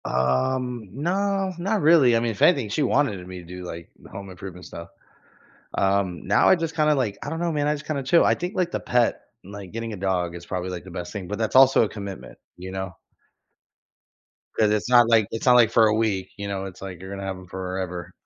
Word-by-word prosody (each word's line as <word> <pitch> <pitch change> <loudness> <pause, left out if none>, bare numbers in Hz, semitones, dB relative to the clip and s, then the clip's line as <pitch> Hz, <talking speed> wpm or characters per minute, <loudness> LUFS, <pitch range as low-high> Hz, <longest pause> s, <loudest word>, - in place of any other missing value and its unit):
Um, 110 - 0
nah, 190 +6 -1
not 195 +4 0
really, 150 -6 +5
I - - +3
mean, 115 0 -1
if 105 - -9
anything, 135 -11 +4
she 110 - -1
wanted 130 -9 +1
me 90 0 -8
to 85 - -12
do, 90 +1 -9
like, 85 -1 -8
the - - -15
home 100 0 -8
improvement 90 -1 -10
stuff. 85 0 -9 0.9
Um, 95 -4 0
now - - +4
I - - +7
just 165 -2 -3
kinda, 155 -1 +3
like 120 -8 -1
I 145 - -5
don't 160 +1 -4
know, 170 -1 0
man, 145 -2 -1
I 150 - +2
just 150 0 -8
kinda 145 -3 -2
chill. 165 +6 +4
I - - +4
think, 180 +4 -5
like, 180 -2 0
the - - -3
pet 120 -2 +1 0.3
like, 100 -2 -9
getting 115 0 -5
a - - -5
dog 90 -3 -1
is 85 0 -9
probably, 90 0 -4
like, 90 -2 -6
the 95 - -11
best 90 0 -6
thing, 100 -4 -6
but 105 - -3
that's 110 -1 -2
also 130 0 +7
a - - -2
commitment, 100 -3 -8 0.2
you 95 +1 -8
know? 95 -1 -5 1.7
'Cause 105 -1 +4
it's 105 +2 -1
not, 120 -2 +6
like 110 -3 +4
it's 115 - -4
not 125 -1 +6
like 115 -2 +5
for 115 -1 +5
a 105 - +2
week, 105 -4 -1
you 100 0 -5
know? 95 -1 -3
It's 95 -1 -10
like 95 -3 -8
you're 95 +1 -9
gonna 100 0 -6
have 95 -1 -4
'em 90 0 -13
forever. 90 -1 -5
105 Hz, 240 wpm, -24 LUFS, 95-130 Hz, 1.7 s, I